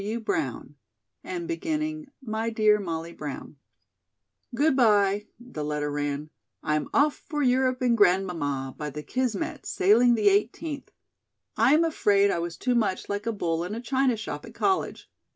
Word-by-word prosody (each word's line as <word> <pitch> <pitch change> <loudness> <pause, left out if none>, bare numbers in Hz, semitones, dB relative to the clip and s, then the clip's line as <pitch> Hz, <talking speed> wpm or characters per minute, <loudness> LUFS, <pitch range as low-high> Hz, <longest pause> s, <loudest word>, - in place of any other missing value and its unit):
C. 210 +3 -3
W. - - -2
Brown," 235 +8 -3 0.5
and 345 -2 -5
beginning: 310 -2 -3 0.2
"My 220 -1 -2
Dear 215 -2 +3
Molly 165 -3 -4
Brown." 145 -1 -7 1.0
"Good 295 +2 +3
bye," 210 -4 +3
the 240 -11 -7
letter 150 0 -2
ran. 145 +1 -3 0.3
"I'm 150 0 0
off 290 +1 +3 0.2
for 295 -2 -1
Europe 255 0 +2
and 240 -2 +3
Grandmamma, 175 - +1
by 150 -1 -3
the 150 +1 -7
Kismet, 250 -3 -2
sailing 235 +6 +4
the 210 -2 +4
eighteenth. 250 +9 -1 0.7
I 240 +6 +5
am 325 - +4
afraid 200 -10 +3
I - - -1
was 170 0 -4
too 250 - 0
much 215 -6 0
like 205 +2 -3
a - - +2
bull 170 -5 -1
in 190 +5 -4
a - - -4
china 260 -1 +1
shop 220 - -6
at - - -12
college. 380 -1 -1
215 Hz, 165 wpm, -26 LUFS, 170-255 Hz, 1.0 s, I